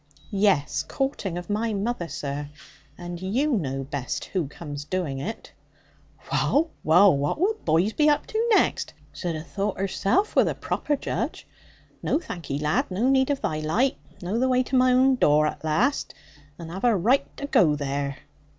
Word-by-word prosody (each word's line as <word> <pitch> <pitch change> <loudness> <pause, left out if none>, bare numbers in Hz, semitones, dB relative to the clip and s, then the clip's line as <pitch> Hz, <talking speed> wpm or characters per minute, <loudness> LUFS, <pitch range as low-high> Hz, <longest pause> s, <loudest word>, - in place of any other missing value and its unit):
'Yes, 195 -8 +2
courting 240 -10 -3
of 175 - -6
my 220 +2 -1
mother, 200 -3 -2
sir. 145 0 -5 0.5
And 175 0 -7
you 250 +11 0
know 135 - -1
best 135 -1 -4
who 180 -7 -2
comes 145 -1 -7
doing 150 -4 -3
it.' 215 +11 -6 0.8
'Wull, 320 +3 +2
wull! 175 +3 +6
What 145 - -1
will 395 +6 +3
boys 170 +7 +2
be 300 0 +4
up 295 - +2
to 450 +2 -1
next? 430 - +2 0.2
Zhud 175 -3 -3
a' - - -7
thought 200 +3 -3
herzelf 195 - 0
wor - - +6
the - - -1
proper 295 - -1
judge. - - -3 0.6
No - - +1
thank 180 - -7
'ee, 140 - -1
lad, 150 +1 0
no 220 +8 +1
need 265 0 +3
of 285 -1 0
thy 155 - -1
light. 210 - +1 0.3
Know 195 +6 -1
the 260 +1 +2
wai 255 0 +3
to 260 - -3
my 255 0 +5
own 260 +1 +4
door, 150 -6 +4
at 150 -1 -3
laste; 210 - 0 0.4
and 165 -1 -8
have 190 +3 -6
a 235 -4 +4
raight 240 +10 +1
to 280 - -4
goo 170 - +4
there.' 140 -1 -3
190 Hz, 180 wpm, -25 LUFS, 155-255 Hz, 0.8 s, wull